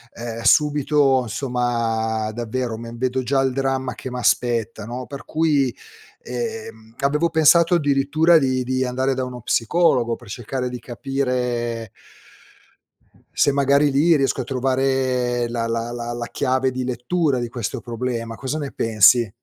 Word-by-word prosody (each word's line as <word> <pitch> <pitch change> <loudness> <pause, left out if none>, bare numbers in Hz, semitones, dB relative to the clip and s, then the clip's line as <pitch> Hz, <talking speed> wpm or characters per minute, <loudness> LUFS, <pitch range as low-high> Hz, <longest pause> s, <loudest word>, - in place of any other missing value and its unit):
ehm, 115 -1 -6
subito 145 -1 +3
insomma, 115 -2 -1
davvero, 120 0 -3
me 115 0 -8
vedo 130 +1 -1
già 135 +2 +1
il 130 -1 0
dramma 135 -1 -1
che 130 - -7
m'aspetta, 120 -3 0
no, 125 +3 -6
per 140 +1 -9
cui, 155 -4 +2 0.6
ehm, 455 -1 -4
ehm, 110 0 -14
avevo 150 +4 +1
pensato 165 +2 +5
addirittura 150 +2 +3
di 130 -2 0
di 130 +1 -1
andare 130 +2 0
da 130 0 -2
uno 125 -1 -8
psicologo 120 0 +2
per 120 -3 -15
cercare 125 +3 -4
di 125 0 -6
capire 120 -3 -2 1.4
se - - +3
magari 140 +1 +3
lì 155 +5 +4
riesco 135 -2 +1
a - - -6
trovare 130 -2 0
la 115 -1 -2
la 115 +1 -2
la 120 0 -5
la 120 0 -4
chiave 130 -1 0
di 130 0 -3
lettura 130 +3 0
di 120 -1 -3
questo 115 -4 -4
problema, 115 -1 -4
cosa 135 +5 -4
ne 140 -2 -5
pensi? 115 +1 +4
125 Hz, 150 wpm, -21 LUFS, 120-140 Hz, 1.4 s, pensato